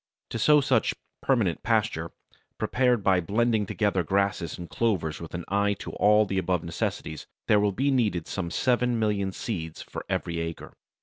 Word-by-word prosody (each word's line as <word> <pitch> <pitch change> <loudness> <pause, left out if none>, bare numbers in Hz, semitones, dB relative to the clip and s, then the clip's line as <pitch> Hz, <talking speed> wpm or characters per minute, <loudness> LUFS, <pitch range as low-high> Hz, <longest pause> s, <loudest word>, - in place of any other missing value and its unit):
To 115 - -3
sow 150 +6 +5
such 130 -4 +2 0.3
"permanent 115 -11 +1
pasture," 105 -8 0 0.5
prepared 125 -4 +1
by 95 -2 +4
blending 110 +3 +1
together 100 -3 +1
grasses 95 -2 0
and 85 - -7
clovers 90 -10 -1
with 85 +1 -7
an 90 - -5
eye 100 +1 +2
to - - -7
all 105 +1 +4
the 95 -1 -1
above 90 -2 0
necessities, 80 -2 -4 0.2
there 105 - +5
will 105 0 +2
be 135 +8 +1
needed 105 -10 +1
some 95 -3 -3
seven 125 +4 +1
million 105 -3 0
seeds 80 -6 -5
for - - -7
every 85 -1 -2
acre. 85 0 -5
100 Hz, 170 wpm, -27 LUFS, 85-115 Hz, 0.5 s, sow